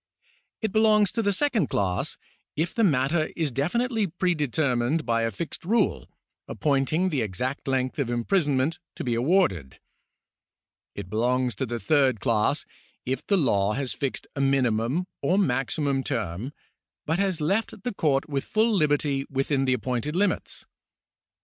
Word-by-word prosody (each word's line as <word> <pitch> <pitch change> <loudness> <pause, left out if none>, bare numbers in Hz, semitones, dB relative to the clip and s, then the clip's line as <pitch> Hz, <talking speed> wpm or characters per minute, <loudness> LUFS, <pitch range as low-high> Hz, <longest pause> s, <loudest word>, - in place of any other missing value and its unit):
It 220 - 0
belongs 215 -2 +4
to 230 - -1
the 205 -2 +2
second 225 - +1
class, 95 -3 -1 0.4
if 165 +3 -1
the 230 - +1
matter 155 -1 +2
is 160 -4 0
definitely 220 - 0
predetermined 155 -5 0
by 115 -1 +1
a 115 - +1
fixed 130 - -6
rule, 225 +7 +1 0.4
appointing 150 +5 +1
the 145 -7 0
exact 125 +8 -3
length 130 +1 -1
of 135 -4 0
imprisonment 145 - +1 0.2
to - - -5
be 120 - -1
awarded. 115 - +1 1.2
It - - -6
belongs 125 +4 +1
to 130 - -2
the 120 +1 -3
third 135 -5 +2
class, 110 0 +1 0.4
if 130 0 -2
the 200 - +3
law 105 - +2
has 135 0 -2
fixed 135 -2 -3
a 140 - -1
minimum 135 +3 +1 0.2
or 185 - +2
maximum 135 -3 +1
term, 95 +6 -3 0.5
but 160 +3 0
has 190 -4 0
left 195 +5 -1
the 245 - -2
court 145 -7 +1
with 140 -3 -2
full 220 +1 +1
liberty 145 -5 +1
within 135 0 0
the 130 - +2
appointed 125 +4 -2
limits. 200 +3 -1
140 Hz, 150 wpm, -26 LUFS, 125-175 Hz, 1.2 s, belongs